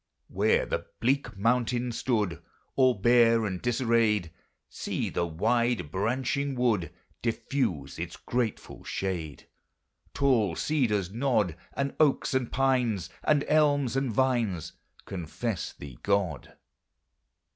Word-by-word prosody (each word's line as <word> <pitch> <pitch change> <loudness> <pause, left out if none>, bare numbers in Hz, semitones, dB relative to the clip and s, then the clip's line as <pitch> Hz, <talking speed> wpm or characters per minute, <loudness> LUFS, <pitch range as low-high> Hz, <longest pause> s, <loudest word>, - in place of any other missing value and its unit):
Where 475 +2 +2
the - - -3
bleak 130 -5 0
mountain 120 +3 +1
stood 105 -9 -1 0.3
All 130 -2 +4
bare 115 +1 +4
and 95 -3 -3
disarrayed, 115 -7 +2 0.4
See - - -3
the 85 - 0
wide 115 +2 0
branching 130 +7 -1
wood 115 -8 +1 0.3
Diffuse 115 - -2
its - - -5
grateful 120 -3 -3
shade; 85 -6 -4 0.7
Tall 120 -11 +2
cedars 105 - 0
nod, 110 - +1 0.2
And 140 0 -1
oaks 150 -4 +3
and 130 -3 0
pines, 125 - +1
And 150 -2 +3
elms 145 -4 +3
and 135 -2 0
vines 115 - 0 0.3
Confess 95 +3 -4
thee 70 -4 -11
God. 100 -8 -1
115 Hz, 110 wpm, -28 LUFS, 95-130 Hz, 0.7 s, All